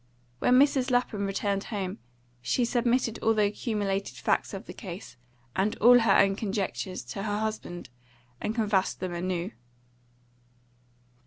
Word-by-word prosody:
When 250 - +4
Mrs. 270 -1 +4
Lapham 245 -5 +1
returned 195 0 -1
home, 190 - -4 0.4
she 180 - +1
submitted 240 -1 +1
all 225 0 +2
the 210 -1 +4
accumulated 205 -2 -2
facts - - 0
of - - -7
the - - -8
case, 190 -2 -8 0.4
and 200 +5 0
all 245 +3 +7
her 225 -4 +4
own 195 0 +4
conjectures, 195 - -3
to 125 +11 -6
her 205 0 -1
husband, 215 -8 -4 0.5
and 215 - -2
canvassed 205 -4 +1
them 185 -1 -3
anew. 175 0 -2
205 Hz, 140 wpm, -28 LUFS, 190-230 Hz, 0.5 s, all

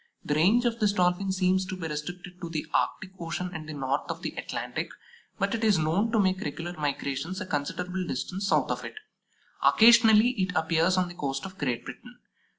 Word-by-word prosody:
The 145 - 0
range 200 +11 +4
of 235 -1 0
this 210 -2 +2
Dolphin 180 +1 +1
seems 185 0 +2
to 185 - -4
be 165 -3 -4
restricted 175 +4 -6
to 170 - -5
the 160 -2 -3
Arctic 190 - 0
Ocean 175 +2 -4
and 155 -1 -7
the 155 - -5
north 135 0 -2
of - - -5
the - - -2
Atlantic, - - -4 0.5
but 200 -1 0
it 230 -1 -2
is 210 -4 +4
known 165 +8 +1
to 225 - +2
make 190 -1 +2
regular 170 +4 -4
migrations 150 +2 -3
a - - -4
considerable 180 +3 -3
distance 185 +9 -3
south - - +2
of - - -3
it. - - -7 0.7
Occasionally 225 0 +7
it 185 -1 -1
appears 165 +3 +2
on 180 -1 +2
the 175 - -8
coast 135 -3 -3
of 190 0 -10
Great 125 -4 -2
Britain. 245 - -10
180 Hz, 200 wpm, -27 LUFS, 155-195 Hz, 0.7 s, Occasionally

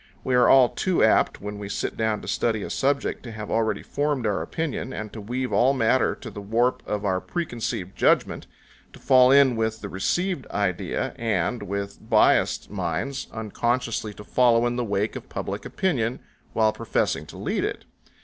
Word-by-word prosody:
We 130 - -1
are 125 -1 +5
all 130 -3 +7
too 185 -2 0
apt 110 - +3
when 105 +1 -6
we 100 -1 -6
sit - - -3
down 110 -1 -1
to - - -8
study 110 -3 0
a - - -5
subject 140 +1 0
to 120 - -8
have 105 -1 -7
already 115 -1 0
formed 145 -4 -1
our 105 -2 0
opinion, 155 -5 -3
and 105 -3 -6
to 110 - -7
weave 125 +5 -3
all 130 +3 +4
matter 130 0 +2
to - - -9
the 105 - -8
warp 115 +5 +1
of 105 -1 -2
our 95 -2 +1
preconceived 115 - -4
judgment, - - +2 0.5
to - - -13
fall 130 -1 +5
in 135 -2 +6
with 110 0 -1
the 100 - -6
received 175 - -1
idea, 100 -4 -2
and, 115 +1 -1
with 100 0 -4
biassed - - +2
minds, 95 +8 -3
unconsciously 115 +1 -2
to 105 - -10
follow 120 +1 +3
in 120 0 0
the 125 - -1
wake 105 0 -1
of - - -8
public - - -5
opinion, 125 -11 -1 0.3
while 110 -1 +3
professing 75 - -1
to - - -11
lead - - -1
it. - - -3
115 Hz, 185 wpm, -25 LUFS, 105-130 Hz, 0.5 s, all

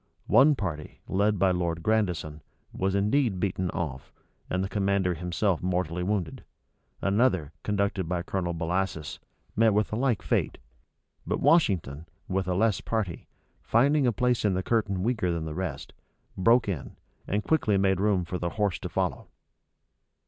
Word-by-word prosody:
One 145 +2 +5
party, 80 - -5
led 105 +2 +1
by 95 0 +3
Lord 85 -2 -1
Grandison, 90 -8 0 0.3
was 95 +1 -1
indeed 105 0 +1
beaten 95 -1 -1
off, 70 -7 -5 0.4
and 95 +1 0
the - - -1
commander 100 -2 +1
himself 90 +2 -1
mortally 90 -1 -1
wounded: 95 -3 -2 0.6
another, 100 - +2
conducted 100 -3 -1
by 90 -1 -1
Colonel 90 -2 -2
Bellasis, 85 -1 -2 0.4
met 110 -1 +4
with 105 0 +1
a - - +1
like 120 -3 0
fate: - - 0 0.7
but - - -1
Washington, 95 - +2 0.2
with 95 0 -1
a 90 - 0
less 110 +1 +2
party, 105 -7 -3 0.3
finding 140 +4 +3
a - - +4
place 125 +1 +1
in 100 -3 +2
the 95 - -1
curtain 100 -5 0
weaker 110 -6 0
than 85 -2 -2
the 80 - -4
rest, 90 -3 -5 0.4
broke 115 +5 +4
in, 90 -9 -4 0.3
and 105 +2 -1
quickly 110 -11 +2
made 95 -1 +2
room 100 -3 +2
for 90 +1 -4
the 85 - -1
horse 105 -1 -1
to - - -5
follow. - - -2
95 Hz, 155 wpm, -27 LUFS, 90-105 Hz, 0.7 s, One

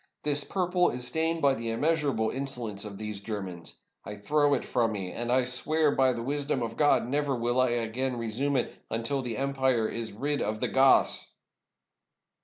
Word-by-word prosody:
This 145 -1 +2
purple 180 0 +1
is 125 0 -3
stained 160 +3 0
by 140 -1 +5
the 115 -2 -4
immeasurable 140 -3 0
insolence 125 -7 -3
of 100 -2 -8
these 105 -1 -5
Germans. 95 -5 -6 0.3
I 105 - -7
throw 145 +7 +2
it - - -3
from 115 -3 0
me, 95 -3 -4
and 120 +1 -3
I 130 +1 +4
swear 150 +5 +2
by 130 -2 +3
the 115 -1 -5
wisdom 140 -1 -1
of 115 0 -4
God, 145 -5 +3
never 140 +1 0
will 120 +1 +1
I 130 - +3
again 120 +2 -2
resume 120 +5 -1
it 125 - -1 0.2
until 115 +5 -2
the 120 -3 -4
empire 130 -4 +1
is 115 0 -5
rid 145 +7 -2
of 110 +1 -2
the - - -1
Goths!" 135 0 +4
125 Hz, 185 wpm, -28 LUFS, 115-140 Hz, 0.3 s, by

